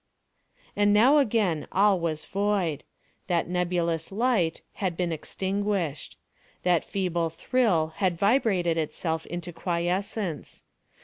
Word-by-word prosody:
And 205 0 +3
now 260 +8 +6
again 205 - +1
all 200 -1 +4
was 160 -2 -2
void. 195 -6 -1 0.4
That 175 -2 +1
nebulous 175 -2 -1
light 210 -6 +1 0.2
had 180 -4 -1
been 175 -2 0
extinguished. 190 -1 -2 0.5
That 175 -2 +3
feeble 175 -4 -1
thrill 165 -4 +1
had 185 -4 +1
vibrated 195 -6 +2
itself 160 +1 -3
into 175 0 -6
quiescence. 180 +1 -3
180 Hz, 110 wpm, -27 LUFS, 165-205 Hz, 0.5 s, now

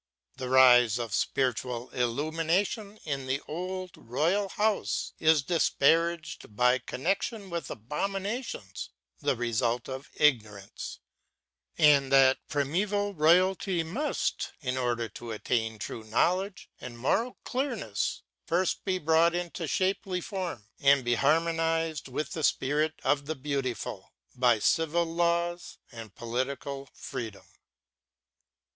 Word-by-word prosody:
The 130 - -4
rise 125 -4 +6
of 115 -4 -4
spiritual 125 -1 -1
illumination 165 - -1
in 140 -3 -3
the 130 +1 0
old 185 +3 -4
royal 170 - 0
house 210 +2 0
is 155 -2 +4
disparaged 165 -5 +1
by 125 +2 +4
connection 195 - -2
with 170 -1 -4
abominations, 195 - -4 0.3
the - - +1
result 120 0 0
of 130 +1 -7
ignor 110 -9 +2
ance; - - -8 0.8
and 145 -4 +5
that 135 -1 +6
primeval 200 +8 0
royalty 180 +2 +3
must 250 - -2
â 125 - -3
in 125 - 0
order 120 -2 -1
to 115 +3 -9
attain 110 0 -1
true 110 +2 -6
knowledge 180 - 0
and 120 -2 -8
moral 225 - 0
clearness 245 - -2
â - - -56
first 175 +2 0
be 190 -2 0
brought 165 +1 +3
into 175 -1 -3
shapely 185 +5 0
form, 175 - -5
and 140 -2 +4
be 120 - +2
harmonized 165 +2 +1
with 140 +3 -4
the 160 - -4
Spirit 150 +4 +1
of 140 -1 +1
the 160 - -2
Beautiful, 135 -4 -4 0.2
by 125 -2 +3
civil 165 +9 +2
laws 170 +1 -1
and 115 -4 -10
political 135 +3 -4
freedom. 100 -5 -7
150 Hz, 120 wpm, -29 LUFS, 125-175 Hz, 0.8 s, rise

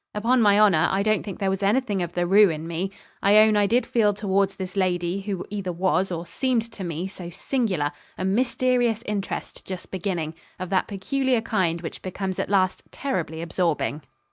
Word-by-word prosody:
Upon 235 +4 +2
my 205 -1 +5
honour, 190 -7 +5
I 195 +1 +1
don't 215 -1 +2
think 200 -4 -7
there 195 -1 0
was 190 +1 -2
anything 205 -1 +1
of 175 -1 -3
the 175 - -1
roué 195 +2 +5
in 155 +1 -7
me. 170 +3 -2 0.3
I 200 +2 +5
own 215 0 +6
I 205 -1 +3
did 235 +3 +2
feel 210 -4 +2
towards 200 -1 +1
this 190 0 -6
lady, 180 -1 0
who 195 -2 -4
either 200 -3 -3
was, 185 +2 +1
or 170 0 -3
seemed 230 +2 -1
to 200 - -8
me, 170 0 -3
so 185 -3 -8
singular, 185 - -1 0.3
a 185 - -2
mysterious 240 +1 +1
interest 205 -2 -4
just 185 -2 -7
beginning 175 -4 -2 0.2
of 185 0 -6
that 190 - +2
peculiar 250 +5 0
kind 180 -7 0
which 165 - -7
becomes 190 0 -4
at - - -2
last 190 -2 +2
terribly 165 - -3
absorbing. 165 -3 -1
195 Hz, 195 wpm, -24 LUFS, 180-215 Hz, 0.3 s, own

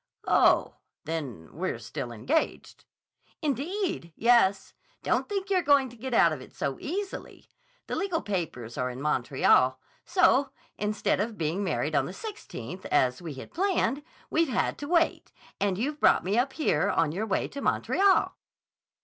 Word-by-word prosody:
"Oh, - - +4 0.3
then 140 - -5
we're - - -2
still 120 - -6
engaged." 275 - -2 0.6
"Indeed, 300 - -2
yes! 220 -5 +3 0.3
Don't - - 0
think 400 -1 -3
you're 370 -2 +4
going 280 -4 +4
to 240 - -14
get 255 +3 -6
out 170 -8 +5
of 140 - -6
it - - -14
so 135 -1 -3
easily. 390 +5 -6 0.3
The - - -4
legal 370 -5 -1
papers 160 - -4
are 125 0 0
in 125 0 -7
Montreal. 130 -2 +3 0.2
So, 285 -6 +3 0.3
instead 210 -1 0
of 215 +1 -2
being 165 +5 -1
married 185 - -1
on - - +2
the - - -7
16th, 420 - -8
as 125 -1 +2
we 160 -5 -6
had 135 - -10
planned, 345 - +1 0.3
we've 325 -2 +2
had - - 0
to 290 - -5
wait, 335 0 +1 0.3
and 195 -2 +1
you've 290 +7 -2
brought - - +4
me 195 +3 0
up 260 +3 +1
here, 230 - +1
on 160 -2 +2
your 205 +7 -3
way 195 - 0
to 280 - -7
Montreal." 390 +6 +2
220 Hz, 160 wpm, -28 LUFS, -, 0.6 s, out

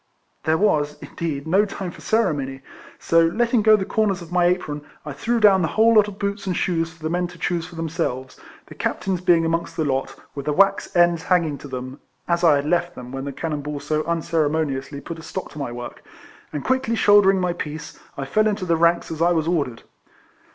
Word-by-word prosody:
There 160 0 +3
was, 150 -7 +1
indeed, 150 -4 -5
no 190 +6 +3
time 195 -3 -5
for - - -14
ceremony, 140 -12 0 0.4
so, 165 0 +3
letting 235 +6 +1
go 215 +1 +6
the 195 -2 -1
corners 205 -3 0
of 170 -1 -11
my 180 -1 +3
apron, 165 -5 -1 0.2
I 150 - -5
threw 230 - -1
down 200 -3 +6
the 160 - +1
whole 225 +6 +4
lot 210 -2 +5
of 200 -2 -8
boots 200 0 -3
and 180 - -1
shoes 165 -2 0
for 165 -1 -18
the 155 - -1
men 180 +1 0
to 175 -1 -13
choose 170 0 -2
for 175 - -13
themselves; 155 -6 -3 0.3
the - - -12
Captain's 185 -2 -2
being 170 -2 +4
amongst 165 +1 -2
the 160 - 0
lot, 135 -1 -1 0.2
with 140 0 -7
the 150 - +1
wax 195 +5 +2
ends 175 -1 +4
hanging 165 -5 +1
to - - -9
them 130 +1 -6 0.3
(as 170 0 0
I 160 -4 +6
had 140 0 -1
left 175 +2 0
them 125 0 -9
when 135 0 -5
the 140 - -4
cannon 150 +1 -4
ball 145 0 -5
so 155 +1 -1
unceremo 160 -2 0
niously 135 0 -6
put 165 -1 -6
a - - -9
stop 185 +3 -6
to 150 - -9
my 140 -4 -3
work), 120 0 -8 0.5
and 150 - -4
quickly 260 -3 +1
shouldering 205 -3 +5
my 180 -1 0
piece, 155 -2 -7 0.2
I 135 - -3
fell 215 +10 +2
into 205 -3 -1
the 170 -2 +2
ranks 170 +1 +2
as 160 0 -5
I 175 +1 +4
was 160 -1 0
ordered. 145 -9 -1
165 Hz, 225 wpm, -22 LUFS, 150-185 Hz, 0.5 s, go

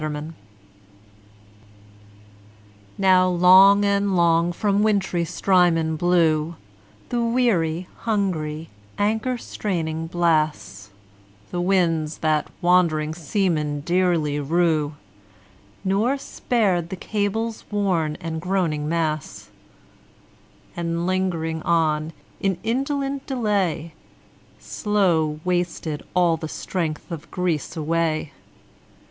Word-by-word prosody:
9 155 - -2
Autoplay 150 +2 -6 2.6
Now 185 -1 +4
long 190 +3 +6
and 200 -1 +1
long 170 0 +3
from 200 +2 0
wintry 195 -5 +1
Strymon 170 -2 +2
blew 165 -1 +2 0.5
The 240 -1 0
weary, 195 -9 +1
hungry, 165 -8 -2 0.3
anchor 220 +5 0
straining 165 -8 -3
blasts, 155 - 0 0.6
The 175 - -2
winds 165 -4 +1
that 155 -1 0 0.2
wandering 165 -4 +3
seamen 160 -3 -1
dearly 170 -3 +1
rue, 155 0 +1 0.9
Nor 210 +8 +1
spared 200 -10 -1
the 190 - -4
cables 215 +3 -2
worn 180 -7 0
and 160 -1 -5
groaning 170 -5 -1
masts; 155 -3 -3 1.2
And, 170 0 -2
lingering 175 -4 -1
on, 155 -2 +1 0.3
in 195 -2 0
indolent 275 +3 -2
delay, 200 - -1 0.6
Slow 170 -8 0
wasted 175 -4 -2
all 175 -2 +3
the 160 0 -6
strength 165 -1 -4
of 165 -2 -7
Greece 175 -3 -2
away. 160 -1 -1
175 Hz, 95 wpm, -23 LUFS, 160-195 Hz, 2.6 s, long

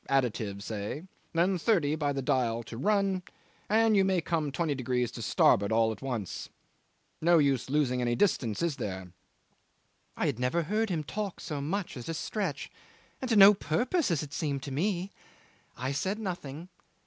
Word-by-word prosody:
additive; 110 -7 0
say, 105 +9 -4 0.3
then, 175 +2 +2
thirty 160 -7 +2
by 145 -2 0
the 135 -1 -2
dial 120 -3 +1
to 115 - -9
run, 195 - +1 0.5
and 220 +1 +4
you 195 - +5
may 190 -1 +2
come 160 -3 -1
twenty 150 +2 0
degrees 125 -2 -1
to - - -7
starboard 100 +2 +3
at 110 -2 +2
once. 120 -8 -4 0.7
No 170 +1 +5
use 140 -5 +2
losing 135 -3 +1
any 120 -1 +1
distance 120 - +1
is 165 -4 0
there?' 95 -6 -5 1.1
I - - 0
had - - -1
never 125 +7 +1
heard 215 +6 0
him 165 -4 -1
talk 200 +4 -4
so 145 -2 -4
much 180 +6 -3
at 125 +1 -7
a 165 - -2
stretch, 165 -1 -3 0.5
and 260 - -3
to 225 - +3
no 200 0 +10
purpose 240 - 0
as 160 -4 0
it 145 - -9
seemed 140 -4 -2
to 140 - -6
me. 185 +6 -1 0.7
I 130 +2 -2
said 190 +9 -1
nothing. 175 -5 -5
150 Hz, 170 wpm, -29 LUFS, 125-190 Hz, 1.1 s, no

